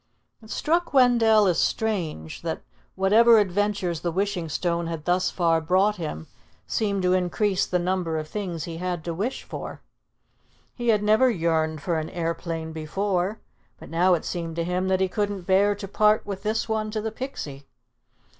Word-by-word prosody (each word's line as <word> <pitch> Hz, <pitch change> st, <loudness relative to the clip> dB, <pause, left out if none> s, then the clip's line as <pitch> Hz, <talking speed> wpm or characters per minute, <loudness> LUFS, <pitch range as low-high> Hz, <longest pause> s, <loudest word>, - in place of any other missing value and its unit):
It 220 Hz, -, -15 dB
struck 335 Hz, +4 st, 0 dB
Wendell 230 Hz, -4 st, +5 dB
as 180 Hz, -3 st, +2 dB
strange 170 Hz, -, -2 dB
that, -, -, -4 dB, 0.3 s
whatever 225 Hz, +5 st, +6 dB
adventures 205 Hz, -3 st, 0 dB
the 170 Hz, -, -2 dB
Wishing 185 Hz, -2 st, -1 dB
Stone 170 Hz, +1 st, -1 dB
had 165 Hz, -2 st, -5 dB
thus 180 Hz, +1 st, +2 dB
far 165 Hz, -2 st, +1 dB
brought 190 Hz, +6 st, +2 dB
him, 150 Hz, -, -5 dB, 0.4 s
seemed 200 Hz, -3 st, -1 dB
to 180 Hz, 0 st, +3 dB
increase 185 Hz, +2 st, +1 dB
the 180 Hz, -, +1 dB
number 175 Hz, -2 st, -1 dB
of 155 Hz, 0 st, -4 dB
things 175 Hz, -4 st, -4 dB
he 165 Hz, 0 st, -6 dB
had 175 Hz, -2 st, -3 dB
to 170 Hz, -, -3 dB
wish 210 Hz, +10 st, -3 dB
for. -, -, -7 dB, 0.9 s
He 240 Hz, -1 st, -5 dB
had 210 Hz, -2 st, +3 dB
never 220 Hz, +5 st, +4 dB
yearned 160 Hz, -6 st, 0 dB
for 170 Hz, -3 st, 0 dB
an 155 Hz, -, -5 dB
aeroplane 165 Hz, -1 st, -3 dB
before, 185 Hz, +5 st, -2 dB, 0.4 s
but -, -, -11 dB
now 180 Hz, +2 st, +4 dB
it 165 Hz, -, -5 dB
seemed 165 Hz, -2 st, -4 dB
to 170 Hz, -, -1 dB
him 180 Hz, +2 st, -1 dB
that 190 Hz, 0 st, +1 dB
he 190 Hz, -, +3 dB
couldn't 205 Hz, 0 st, -2 dB
bear 195 Hz, +3 st, +3 dB
to 200 Hz, -1 st, -7 dB
part 210 Hz, +2 st, +3 dB
with 195 Hz, -2 st, -5 dB
this 220 Hz, +2 st, -1 dB
one 220 Hz, -1 st, -1 dB
to 215 Hz, 0 st, -3 dB
the 220 Hz, +1 st, -3 dB
Pixie. 150 Hz, -, -7 dB
185 Hz, 175 wpm, -25 LUFS, 165-210 Hz, 0.9 s, whatever